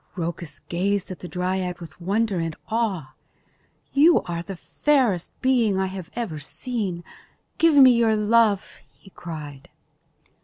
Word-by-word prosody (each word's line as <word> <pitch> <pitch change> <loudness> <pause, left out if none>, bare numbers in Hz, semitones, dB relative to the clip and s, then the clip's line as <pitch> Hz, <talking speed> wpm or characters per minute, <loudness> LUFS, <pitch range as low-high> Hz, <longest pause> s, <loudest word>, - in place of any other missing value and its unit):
Rhoecus 165 -4 -5
gazed 195 +2 -1
at 185 - -7
the 180 - -7
dryad 180 0 -2
with 170 +1 -11
wonder 200 +1 0
and 165 -1 -3
awe. 195 - -1 0.8
"You 310 +5 +5
are 170 -1 -4
the 195 +2 -7
fairest 240 - +1
being 235 -7 +3
I 190 - +1
have 185 -2 -6
ever 225 -11 -3
seen. 195 - -4 0.6
Give 330 -2 +5
me 265 -3 +9
your 230 -2 +3
love," 215 -1 +2
he 195 - -20
cried. 150 -6 -9
190 Hz, 140 wpm, -24 LUFS, 170-230 Hz, 0.8 s, me